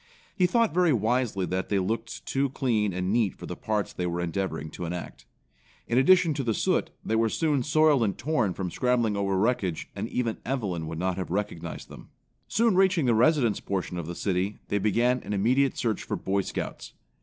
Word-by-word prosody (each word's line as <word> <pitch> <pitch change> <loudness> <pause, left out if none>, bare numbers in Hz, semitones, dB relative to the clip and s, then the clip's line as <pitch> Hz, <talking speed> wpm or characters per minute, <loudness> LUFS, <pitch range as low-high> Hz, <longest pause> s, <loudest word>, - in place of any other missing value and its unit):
He 180 -3 +3
thought 230 +2 +2
very 175 -1 +3
wisely 115 -4 +1
that 95 +2 -3
they 100 - +2
looked 115 +5 -3
too 135 +1 0
clean 115 -6 0
and 90 +2 -1
neat 110 -5 +1
for - - -9
the - - -5
parts 105 -2 -2
they 90 - -2
were 85 0 -2
endeavoring 85 -3 -3
to 90 - -6
enact. 85 -7 -6 0.6
In 120 - +2
addition 170 +3 +5
to 140 -1 -2
the 115 -3 0
soot, - - +1 0.2
they 110 - 0
were 115 0 +2
soon 150 +1 +1
soiled 150 0 +3
and 100 -3 -1
torn 120 - 0
from 90 -3 -3
scrambling 120 -2 +1
over 100 -1 0
wreckage 95 -5 0
and - - -4
even 115 -3 -2
Evelyn 100 -11 -2
would 80 0 -5
not 90 +1 -1
have 95 - -4
recognized 100 -2 -4
them. - - -13 0.4
Soon 230 -3 +2
reaching 185 -5 +3
the 120 - +3
residence 120 -2 +3
portion 90 -2 -3
of 80 - -5
the 85 - -5
city, 95 +2 -1
they 100 - +1
began 120 +5 +2
an - - -5
immediate 125 +7 +2
search 110 -4 -1
for - - -3
Boy 100 +1 0
Scouts. - - -6
110 Hz, 200 wpm, -27 LUFS, 95-130 Hz, 0.6 s, addition